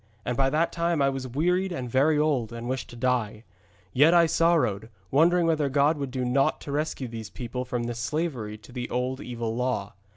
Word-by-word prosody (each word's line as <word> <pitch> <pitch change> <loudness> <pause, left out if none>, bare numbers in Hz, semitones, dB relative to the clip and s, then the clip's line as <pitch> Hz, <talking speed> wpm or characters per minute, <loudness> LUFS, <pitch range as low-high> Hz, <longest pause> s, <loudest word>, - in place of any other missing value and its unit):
And 125 - -1
by 135 +1 +2
that 155 +4 +1
time 170 -1 0
I 140 -1 +3
was 135 -1 -4
wearied 180 +8 0
and 130 -8 -4
very 140 +5 +3
old, 140 -7 +1
and 115 0 -6
wished 130 0 -3
to - - -11
die. 120 -3 -1 0.5
Yet 155 +6 +5
I 170 -1 +7
sorrowed, 160 - +2 0.2
wondering 170 +5 +4
whether 155 -3 +1
God 145 +3 +2
would 140 -2 -3
do 130 0 -2
naught 135 +3 +2
to 145 - -6
rescue 145 -3 -2
these 115 -2 -7
people 125 +2 -5
from 125 -1 -2
this 120 0 -4
slavery 120 -4 -2
to 105 +3 -16
the 125 -1 -5
old 125 +2 -2
evil 115 -2 -4
law. 125 -5 -2
130 Hz, 205 wpm, -26 LUFS, 120-155 Hz, 0.5 s, I